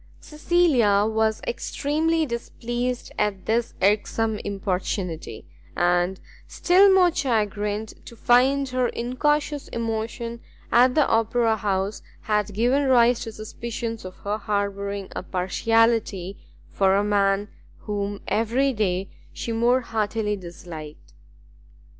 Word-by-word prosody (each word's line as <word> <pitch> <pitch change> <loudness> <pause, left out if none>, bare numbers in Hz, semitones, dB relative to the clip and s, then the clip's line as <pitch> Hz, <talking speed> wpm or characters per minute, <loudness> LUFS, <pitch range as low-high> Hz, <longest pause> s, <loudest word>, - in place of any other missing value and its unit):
Cecilia 300 -11 +2
was 220 0 0
extremely 320 - 0
displeased 240 0 -4
at 205 -3 -1
this 230 +1 0
irksome 215 +2 +1
importunity, 185 - -3 0.3
and 175 +2 +1 0.3
still 385 +3 +4
more 365 -3 +5
chagrined 210 -4 -1
to 235 - -10
find 260 +4 +3
her 255 -1 +1
incautious 290 +5 -1
emotion 230 +1 -4 0.3
at 250 +2 +5
the 305 - +4
Opera 225 0 +2
house, 200 -1 -2 0.2
had 210 -2 -1
given 255 +6 +2
rise 245 -2 +4
to 225 - -6
suspicions 225 +1 -6
of 185 0 -8
her 205 +2 -2
harbouring 200 -1 -2
a - - -3
partiality 200 +1 +1 0.3
for 195 -1 +2
a 200 - +2
man 200 0 +1 0.3
whom 205 -1 -3
every 245 +5 +1
day 195 -3 -1 0.2
she 230 - -5
more 240 +3 +2
heartily 215 -2 -1
disliked. 170 -4 -10
220 Hz, 110 wpm, -24 LUFS, 200-245 Hz, 0.3 s, more